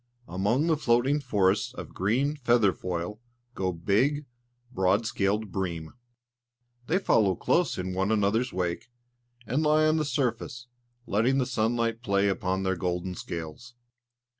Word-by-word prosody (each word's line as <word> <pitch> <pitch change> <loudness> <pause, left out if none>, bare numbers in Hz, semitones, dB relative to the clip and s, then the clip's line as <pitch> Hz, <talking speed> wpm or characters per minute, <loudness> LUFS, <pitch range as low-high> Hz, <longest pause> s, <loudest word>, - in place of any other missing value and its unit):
Among 105 - +1
the 165 -2 +2
floating 130 +2 +2
forests 105 0 +1
of - - -8
green 125 +10 +1
feather 120 -8 +3
foil 90 +4 -4 0.3
go 95 -4 -1
big, 110 - +1 0.5
broad 95 +1 +2
scaled 105 0 -1
bream. 85 -5 -4 0.9
They 175 - +2
follow 105 - +3
close 175 - +1
in 90 0 -3
one 95 +3 0
another's 110 +4 +1
wake, 90 +5 -3 0.6
and 130 +8 0
lie 155 0 +4
on 155 +1 +3
the 155 - +1
surface, 130 -3 -2 0.4
letting 120 +6 +2
the 130 - +2
sunlight 115 -1 0
play 100 -3 +2
upon 95 -1 -1
their 95 0 0
golden 90 +1 -2
scales. 85 +9 -7
110 Hz, 140 wpm, -27 LUFS, 95-125 Hz, 0.9 s, lie